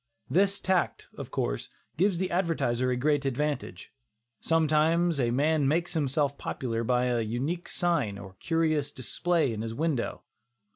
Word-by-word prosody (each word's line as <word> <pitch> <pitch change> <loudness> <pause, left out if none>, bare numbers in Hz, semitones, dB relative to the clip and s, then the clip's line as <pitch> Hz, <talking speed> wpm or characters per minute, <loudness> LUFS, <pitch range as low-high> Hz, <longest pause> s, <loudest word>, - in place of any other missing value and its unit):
This 195 +5 +3
tact, 185 -2 0
of - - -7
course, - - -2 0.3
gives 190 +1 +2
the 185 +1 -1
advertiser 160 -9 +1
a 125 - +1
great 145 +2 +2
advantage. 135 -8 -3 0.5
Sometimes 165 +1 +2
a 120 -2 +2
man 145 +3 +2
makes 170 +4 +1
himself 145 -2 0
popular 115 -3 -3
by 125 +1 +2
an 120 -3 0
unique 145 +10 -2
sign 145 - 0
or 100 -1 -9
a - - -25
curious 160 -3 0
display 155 +2 0
in 110 - -4
his 115 0 -4
window. 150 -4 -1
145 Hz, 150 wpm, -28 LUFS, 125-165 Hz, 0.5 s, This